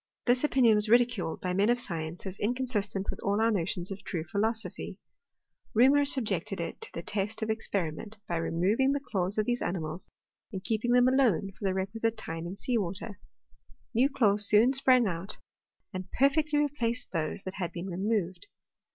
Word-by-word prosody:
This 250 +2 +3
opinion 260 -6 +4
was 210 0 +1
ridiculed 235 -8 +2
by 180 -1 -2
men 200 +4 +2
of 240 0 +3
science 170 -5 -4
as 190 0 -6
inconsistent 210 -4 -1
with - - -9
all 200 +1 0
our 225 +1 +3
notions 180 -1 -2
of 195 - -6
true 165 -4 -3
philosophy. 220 +7 -2 0.8
Reaumur 275 +5 +5
subjected 210 - 0
it 170 - -5
to - - -4
the 170 - -6
test 210 +3 -2
of 220 - 0
experiment, 205 -1 -3
by 170 - -1
removing 195 +12 +1
the 285 - 0
claws 195 -7 -2
of 215 - +1
these 245 +1 -1
ani 185 - -1
mals, 160 +2 -6 0.4
and 190 -3 -6
keeping 230 +2 0
them 245 0 +5
alone 245 -8 +2
for 200 - -8
the 190 -1 +1
requisite 220 +4 -2
time 165 -4 -4
in 180 - -6
sea 240 +3 0
water: 195 +2 -5 0.7
new 250 +4 +3
claws 210 -6 +5
soon 225 +5 +5
sprang 255 -2 +4
out, 185 0 -3 0.6
and 185 0 -6
per 275 +2 +4
fecfdy 305 +1 -1
replaced 255 -5 -1
those 165 +2 -3
that 185 - -5
had 175 -2 -2
been 175 +1 -6
removed. 190 - -2
210 Hz, 185 wpm, -29 LUFS, 185-240 Hz, 0.8 s, Reaumur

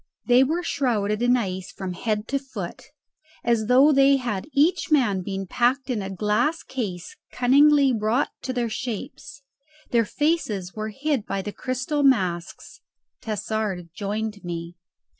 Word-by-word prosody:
They 245 +1 +6
were 325 +6 -1
shrouded 225 -9 0
in 245 +1 +4
ice 185 -5 -4
from 190 -2 -5
head 215 +2 -2
to 275 - 0
foot, 230 -10 -7 0.6
as 230 -3 +1
though 265 +5 +6
they 275 0 +5
had 235 -4 -3
each 310 +7 +2
man 240 - +3
been 195 +1 -4
packed 255 +7 +1
in 225 -4 -1
a 190 - -5
glass 215 - 0
case 200 - -5 0.2
cunningly 280 +2 +5
wrought 225 +4 0
to 260 - -3
their 245 -2 -1
shapes. 250 +7 -6 0.5
Their 230 -2 +3
faces 220 - -1
were 215 0 -4
hid 270 0 -2
by 195 - -2
the 210 - -5
crystal 260 +3 -2
masks. 185 -11 0 0.4
Tassard 210 -4 -3
joined 210 +1 -4
me. 170 0 -5
235 Hz, 145 wpm, -24 LUFS, 200-270 Hz, 0.6 s, They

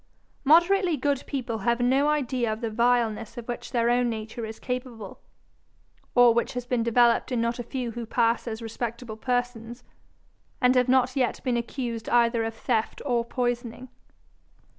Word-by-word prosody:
Moderately 345 +3 +4
good 280 0 0
people 240 -5 -3
have 235 +3 +1
no 265 +4 +3
idea 255 -6 0
of 215 +2 -5
the 230 -2 -2
vileness 235 -1 +1
of 235 - -7
which 240 - -6
their 235 -1 +1
own 245 0 +2
nature 220 +1 -5
is 220 - -8
capable, 250 -5 -6 1.0
or 245 -1 +7
which 235 - 0
has 245 -1 -4
been 245 -1 0
developed 235 +2 +3
in 245 - 0
not 235 +1 -1
a - - -3
few 245 -1 -4
who 235 0 -6
pass 230 +1 +1
as 225 0 -5
respectable 230 0 -5
persons, 245 0 -3 0.8
and 250 -1 +4
have 250 -1 +2
not 255 0 +3
yet 255 -4 0
been 250 -2 0
accused 235 -1 -4
either 235 -1 +3
of 225 0 -4
theft 225 -1 -1
or 240 -4 +1
poisoning. 245 +1 -3
240 Hz, 165 wpm, -26 LUFS, 230-250 Hz, 1.0 s, or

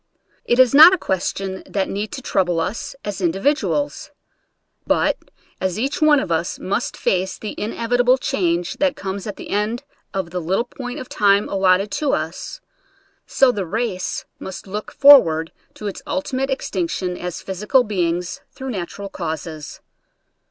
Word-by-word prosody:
It 240 - +2
is 255 -1 +6
not 320 +6 +10
a - - -6
question 190 - -2
that 195 -2 -1
need 205 +2 -3
to 265 - -6
trou 190 - +2
ble 175 -2 -1
us 200 +10 -3
as 205 -1 -4
individuals; 285 - 0 0.8
but - - +2 0.5
as 190 -1 -1
each 275 +9 -2
one 305 -2 +6
of 185 - -4
us 165 +1 -1
must 200 +6 -2
face 190 0 0
the 215 - -6
inevitable 245 +3 +1
change 175 -10 -1
that 285 -1 +1
comes 195 +1 -5
at 205 - -4
the - - -9
end 215 +5 -1 0.3
of 190 -3 -3
the 180 0 -3
little 190 +8 0
point 245 0 -7
of 255 - -7
time 200 -1 +3
allotted 195 +1 +2
to 280 +8 0
us, 160 +2 -4 0.7
so 270 -2 +4
the 205 -5 -3
race 215 -1 -2
must 190 - -7
look 205 +2 -5
forward 165 - +6 0.2
to 210 - -9
its 200 - -4
ultimate 270 -2 -2
extinction 180 -7 -2
as 180 -1 -6
physical 210 +7 +2
beings 175 -4 -2
through 265 0 -6
natural 200 0 -5
causes. 160 -4 -6
200 Hz, 160 wpm, -21 LUFS, 180-250 Hz, 0.8 s, not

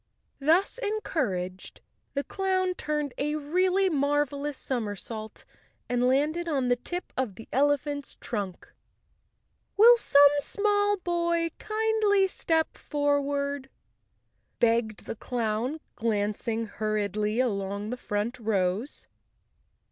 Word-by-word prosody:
Thus 330 - +3
en¬ 430 -1 -2
couraged, 185 - -3 0.4
the 280 - 0
clown 375 0 0
turned 300 -5 -2
a 295 +2 0
really 365 +6 +2
marvelous 290 -2 0
som¬ 245 -4 -1
ersault 215 +2 -7 0.4
and 245 0 +1
landed 300 +6 +1
on 270 -6 0
the 245 - +4
tip 350 +9 -6
of 250 -7 -2
the 225 - -11
elephant's 285 +1 +1
trunk. 200 -6 -5 1.0
"Will 470 +3 +9
some 285 -8 +6
small 410 +4 +1
boy 340 -2 0
kindly 430 -2 +2
step 325 -4 0
forward," 285 -1 -1 0.9
begged 230 -2 +1
the - - -5
clown, 235 +5 -2 0.2
glancing 220 +1 -1
hurriedly 210 0 -1
along 200 -3 -1
the - - -1
front 230 +1 -3
rows. 210 +2 -1
280 Hz, 110 wpm, -27 LUFS, 220-340 Hz, 1.0 s, Will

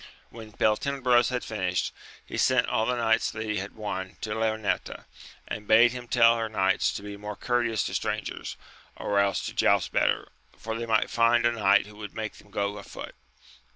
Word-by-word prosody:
When 110 -2 -10
Beltenebros 120 +3 +2
had 125 -1 -2
finished, 90 -4 -2 0.3
he - - -7
sent 130 -2 +3
all 110 0 0
the 125 - +1
horses 115 -2 +1
that 110 - -4
he 105 -1 -2
had 100 +2 -5
won 95 -4 -5
to 105 - -3
Leonoreta, 110 -1 -2 0.4
and 105 -1 -6
bade 115 +2 +6
her 125 -1 -7
tell 115 -1 +5
her 115 -1 -2
knights 95 -3 +2
to - - -6
be 100 0 -7
more 105 0 -6
courteous 120 -3 0
to - - -4
strangers, - - -3 0.4
or 100 -1 0
else 100 -2 +1
to - - -5
joust - - +2
better, - - +1 0.3
for 110 0 -5
they 115 0 -4
might 110 -1 +2
find 115 0 +3
a 120 - +4
kuight 100 -3 +4
who 105 0 -14
would 105 -1 -8
make 110 -1 -5
them 105 - -18
go 100 0 -2
afoot. - - -9
110 Hz, 190 wpm, -27 LUFS, 105-115 Hz, 0.4 s, bade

